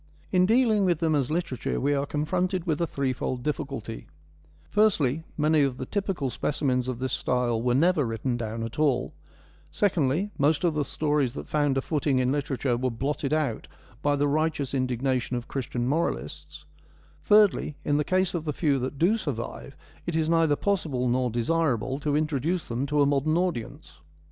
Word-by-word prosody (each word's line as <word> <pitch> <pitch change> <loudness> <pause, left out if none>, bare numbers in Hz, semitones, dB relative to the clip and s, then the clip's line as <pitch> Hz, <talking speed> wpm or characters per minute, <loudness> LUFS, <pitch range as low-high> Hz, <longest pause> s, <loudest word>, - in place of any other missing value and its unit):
In 185 -1 +4
dealing 225 -2 +3
with 175 -4 +2
them 160 -2 +1
as 140 -4 +1
literature 155 -7 -2
we 145 +2 +1
are 140 0 0
confronted 180 +5 -1
with 160 -2 0
a 170 - +1
threefold 130 -3 -2
difficulty: 135 -6 -4 0.6
firstly, 165 - +2 0.2
many 155 0 +3
of 135 -3 +1
the - - -8
most 130 - -6
typical 190 -10 -1
speci 150 +4 -3
mens 125 -2 +1
of 130 -2 -2
this 130 +1 -3
style 120 -2 0
were 120 0 +1
never 165 +2 +3
written 115 +1 -2
down 115 -1 -4
at 115 +5 -6
all; 145 -4 +1 0.6
secondly, 180 0 +1
most 145 +3 +2
of 170 -3 +2
the 150 -1 0
stories 145 -3 0
that - - -6
found 145 -3 +1
a 135 - 0
footing 145 -3 0
in 130 0 +2
literature 135 -3 -1
were 130 +1 0
blotted 135 +4 -2
out 155 -7 -1 0.3
by 145 0 +2
the 145 0 +1
righteous 150 -2 0
indigna 130 0 0
tion 125 +1 -3
of 120 - -6
Christian 120 -2 -3
moralists; 155 +6 -3 0.6
thirdly, 205 -7 +4
in 145 - +2
the 150 - +2
case 185 +3 +1
of 170 -3 -2
the 150 -2 -2
few 140 -2 +1
that 130 +3 -4
do 185 +9 +3
survive, 140 - -5 0.3
it 170 - -1
is 160 -1 +1
neither 165 -2 +3
possible 150 -10 -1
nor 125 +1 +1
desirable 130 +1 0
to 145 -1 0
introduce 155 +3 -1
them 120 +4 -2
to 145 0 +3
a - - +4
modern 145 +3 +2
audience. 175 -11 -3
145 Hz, 185 wpm, -26 LUFS, 130-160 Hz, 0.6 s, In